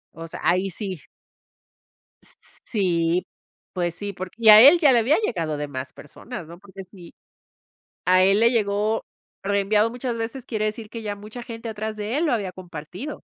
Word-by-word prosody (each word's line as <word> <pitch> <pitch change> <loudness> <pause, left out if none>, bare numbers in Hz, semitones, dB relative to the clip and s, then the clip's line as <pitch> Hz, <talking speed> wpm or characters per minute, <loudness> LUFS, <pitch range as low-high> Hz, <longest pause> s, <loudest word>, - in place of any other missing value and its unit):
O 165 0 -8
sea, - - -9
ahí 180 +4 +2
sí. 190 -3 -5 1.2
S - - -9
s - - -8
sí. 175 -4 0 0.5
Pues 175 -2 -2
sí, 205 +2 -5
por 185 0 -7
y 225 -1 +4
a 210 0 +11
él 285 +8 +9
ya 295 -5 +5
le 240 - +5
había 265 +8 +3
llegado 165 - -2
de 145 0 -4
más 130 -1 -6
personas, 185 - -9
¿no? 170 +2 -12
Porque 195 -1 -11
si, 175 -4 -13 0.9
a 185 0 +5
él 195 +2 +4
le 230 +2 +4
llegó 210 0 0 0.4
reenviado 200 +2 +2
muchas 245 0 -4
veces, 230 +3 -5
quiere 215 -2 -1
decir, 215 0 -4
que 230 -1 -7
ya 205 -1 -4
mucha 215 +4 -9
gente 230 -1 -7
atrás 215 0 -4
de 215 +4 -3
él 335 - +1
lo - - +1
había 200 -6 -1
compartido. 180 - -8
205 Hz, 190 wpm, -23 LUFS, 180-230 Hz, 1.2 s, a